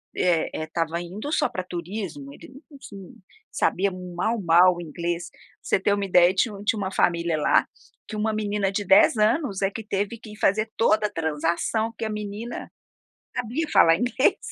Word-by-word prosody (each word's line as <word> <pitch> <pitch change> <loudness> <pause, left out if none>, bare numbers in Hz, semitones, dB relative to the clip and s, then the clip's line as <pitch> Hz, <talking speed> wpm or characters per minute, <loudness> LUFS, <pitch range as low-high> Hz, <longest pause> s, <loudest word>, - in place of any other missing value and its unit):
eh 175 -3 +1
eh, 155 - -3
estava 165 +1 -2
indo 200 - -6
só - - +2
para 185 - -4
turismo, 175 -5 -6
ele - - -13 0.2
não 280 - -12 0.7
sabia 195 +2 +1
mal 180 +5 -3
mal 175 +1 +5
o 175 - -7
inglês. 170 +2 -4 0.3
Você - - +1
ter 200 +1 +1
uma 200 - -2
ideia 180 -1 +5
tinha 210 +2 0
tinha 220 - +1
uma 190 -1 -3
família 170 -3 +1
lá, 150 - +3 0.4
que 220 - -7
uma 215 +1 0
menina 205 -2 -1
de 200 0 -3
10 195 +4 +5
anos 215 - +1
é 195 - +3
que 225 - -7
teve 205 +2 -2
que 215 -3 -12
fazer 215 +2 +2
toda 215 -1 +3
a - - -10
transação, 170 +6 -1
que 230 - -3
a - - -3
menina 210 +2 -6 0.7
sabia 250 +6 -2
falar 165 0 +6
inglês, 255 - +1
195 Hz, 180 wpm, -24 LUFS, 175-215 Hz, 0.7 s, falar